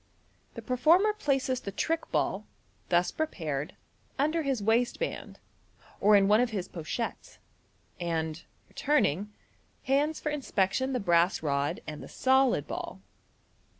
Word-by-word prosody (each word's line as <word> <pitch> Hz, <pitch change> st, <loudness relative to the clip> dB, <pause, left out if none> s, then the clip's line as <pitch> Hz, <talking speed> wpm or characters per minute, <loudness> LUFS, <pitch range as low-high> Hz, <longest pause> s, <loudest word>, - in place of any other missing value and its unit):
The -, -, -7 dB
performer 325 Hz, -, +4 dB
places 270 Hz, -9 st, 0 dB
the 200 Hz, -, -6 dB
trick 325 Hz, -, -2 dB
ball, -, -, -1 dB, 0.4 s
thus 175 Hz, 0 st, +2 dB
prepared, 155 Hz, -, -3 dB, 0.4 s
under 310 Hz, +4 st, +1 dB
his 275 Hz, -5 st, -1 dB
waistband, 240 Hz, -, -1 dB, 0.6 s
or 210 Hz, +1 st, +5 dB
in 195 Hz, -1 st, +5 dB
one 210 Hz, +3 st, +5 dB
of 250 Hz, -, +1 dB
his 200 Hz, -5 st, -3 dB
pochettes, 175 Hz, +8 st, -5 dB, 0.6 s
and, 160 Hz, -2 st, -2 dB, 0.2 s
returning, 210 Hz, -, 0 dB, 0.5 s
hands 290 Hz, +3 st, +1 dB
for 300 Hz, -, -2 dB
inspection 260 Hz, -2 st, 0 dB
the 250 Hz, -, 0 dB
brass 175 Hz, -3 st, +2 dB
rod 140 Hz, -1 st, -1 dB
and 155 Hz, -1 st, -7 dB
the -, -, -10 dB
solid 265 Hz, -1 st, +2 dB
ball. -, -, -6 dB
235 Hz, 125 wpm, -29 LUFS, 175-280 Hz, 0.6 s, or